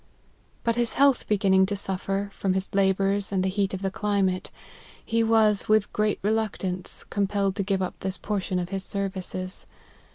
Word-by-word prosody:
But 230 0 +1
his 240 -1 +1
health 280 -1 +3
beginning 190 -2 +3
to 205 - -1
suffer, 195 +1 -2
from 190 -2 0
his 190 0 -1
la 195 -1 +4
bours 195 +1 0
and 190 -2 +1
the 190 - +1
heat 195 0 0
of 190 - -7
the 195 - 0
climate, 195 -3 0 0.6
he 230 0 +1
was, 220 -2 +3
with 215 -1 +3
great 210 -1 +1
reluctance, 200 -4 -1
compelled 200 -1 0
to - - +1
give 195 -1 0
up 185 - -5
this 190 0 -2
portion 195 -3 -2
of 175 -1 -2
his 195 0 -3
services. 185 -2 -4
195 Hz, 175 wpm, -26 LUFS, 190-210 Hz, 0.6 s, la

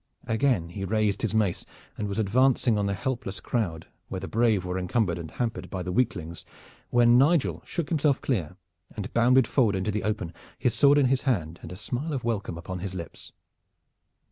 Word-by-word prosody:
Again 110 -7 +1
he 95 +3 -6
raised 105 0 0
his 110 -2 -1
mace 105 -5 +1 0.3
and 105 - -3
was 100 - -4
advancing 120 +3 +3
on 100 -1 0
the 100 - -1
helpless 100 -4 -3
crowd 85 -10 -2 0.2
where 95 - -4
the 95 - -6
brave 110 -5 +2
were 90 +1 -2
encumbered 90 -1 0
and 80 -2 -6
hampered 100 -3 -3
by 95 -2 -4
the 90 - -3
weaklings, 90 -7 -1 0.5
when 120 0 +5
Nigel 130 - +3
shook 170 -4 -3
himself 150 -4 +2
clear 90 - -2 0.4
and 105 -3 -5
bounded 125 +2 +5
forward 115 -5 +2
into 95 +3 -1
the 105 0 -1
open, 105 -5 -2 0.2
his 125 - +1
sword 140 +3 +5
in 145 - +5
his 130 0 +2
hand 85 - -1
and - - -9
a - - -6
smile 125 - -3
of 135 - -3
welcome 105 -7 -2
upon 90 +2 -6
his 95 +1 -5
lips. 85 -3 -8
105 Hz, 195 wpm, -27 LUFS, 90-125 Hz, 0.5 s, when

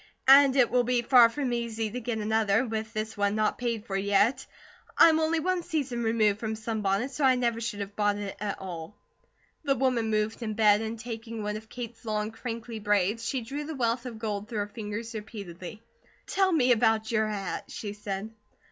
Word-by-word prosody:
"And 275 0 +8
it 255 -3 +4
will 250 0 +3
be 240 0 +1
far 240 -1 +7
from 260 0 -2
easy 225 -2 -2
to 250 - -4
get 235 -1 -3
another, 220 +1 +2
with 220 -1 -4
this 215 0 -4
one 205 0 +1
not 215 0 0
paid 235 -3 -2
for 195 - -4
yet. 200 +5 +2 0.5
I'm 320 -1 +7
only 320 +1 +1
one 365 +2 0
season 285 -8 -2
removed 220 -2 +2
from 220 -1 -3
sunbonnets, 220 +2 -1
so 295 - -3
I 260 -1 +5
never 235 -2 0
should 210 -3 -3
have 200 0 -6
bought 205 -1 +1
it 205 -1 -5
at 205 0 -3
all." 175 0 -7 0.7
The 275 -2 +2
woman 250 -3 +1
moved 215 +2 -1
in 215 -2 -3
bed, 210 -1 +5
and 225 +1 -4
taking 225 -1 -6
one 210 0 -2
of 220 +1 -9
Kate's 235 -1 -8
long, 215 -1 -2
crinkly 230 0 -6
braids, 205 +1 +1
she 260 +2 -2
drew 275 +6 -5
the 315 0 -5
wealth 240 0 -1
of 235 -3 -7
gold 210 -1 -4
through 225 - -4
her 205 - -3
fingers 220 +2 -6
repeatedly. 210 -1 -8 0.4
"Tell 385 -1 +2
me 260 -7 +3
about 225 -1 +2
your 215 -1 +2
hat," 200 -3 -4
she 205 -2 -6
said. 205 0 -5
225 Hz, 200 wpm, -28 LUFS, 210-245 Hz, 0.7 s, And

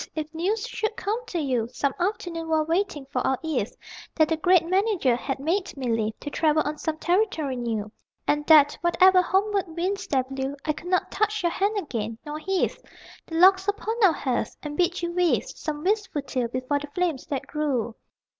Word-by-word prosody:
If 310 0 -4
news 405 +8 -1
should 435 -2 -3
come 440 +4 -2
to 370 - -4
you 255 -7 0
Some 275 +1 -1
afternoon, 345 -3 -2
while 315 -1 +2
waiting 330 -4 -1
for 255 - 0
our 265 +1 +1
eve, 295 -10 -1 0.4
That 315 -2 +3
the 325 - +2
great 350 +2 +4
Manager 370 - +2
had 265 +2 -3
made 340 +4 -1
me 255 -3 -2
leave 220 -1 -2
To 290 - -6
travel 310 0 +2
on 300 +1 -4
some 315 -1 -2
territory 340 -6 0
new; 225 -4 -3 0.4
And 295 0 +2
that, 295 -2 +7
whatever 365 +2 +5
homeward 395 +2 +1
winds 370 +4 -3
there 265 -2 +2
blew, 270 +1 -4
I 305 - +1
could 315 - -10
not 365 - +1
touch 425 -1 0
your 345 - +2
hand 410 +4 0
again, 230 - -3
nor 300 +1 -5
heave 380 +3 -1 0.5
The 325 - -6
logs 375 +3 +6
upon 415 +2 -1
our 385 - +7
hearth 255 -5 -2
and 295 -1 -5
bid 350 +1 0
you 345 - -1
weave 355 -1 +2
Some 300 -1 -5
wistful 390 -7 0
tale 255 -3 -2
before 255 +4 -1
the 295 - -7
flames 345 -7 -1
that 275 -3 -3
grew.... 275 -7 -1
320 Hz, 195 wpm, -25 LUFS, 275-375 Hz, 0.5 s, that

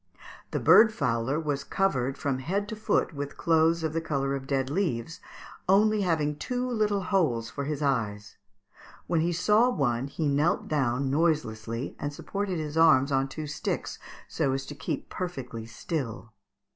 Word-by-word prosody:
The - - -2
bird 220 0 +7
fowler 125 - 0
was 145 -3 -2
covered 135 -8 0
from 135 -2 -1
head 195 +9 -2
to 220 - -4
foot 215 -4 0
with 145 -1 -5
clothes 165 0 +3
of 160 -1 -1
the 165 - 0
colour 140 -3 -1
of 135 -1 -4
dead 135 -1 0
leaves, 165 -4 -2 0.5
only 210 +2 +4
having 155 -5 0
two 250 +6 -2
little 215 -4 +1
holes 155 - +1
for 140 - -4
his 150 0 -3
eyes. 105 -7 -1 0.7
When 165 -2 +1
he 170 +2 +1
saw 210 +8 +3
one 135 - 0
he 155 +2 -2
knelt 145 +5 +1
down 135 -2 0
noiselessly, 130 -7 -1
and 145 - -3
supported 195 +5 -3
his 155 -1 -4
arms 155 -4 +5
on 135 0 +2
two 155 +3 -6
sticks, 145 - -3 0.3
so 140 -5 0
as 135 0 -3
to 145 - -7
keep 145 - -4
perfectly 125 -11 -5
still. 115 -3 -5
150 Hz, 165 wpm, -28 LUFS, 135-175 Hz, 0.7 s, bird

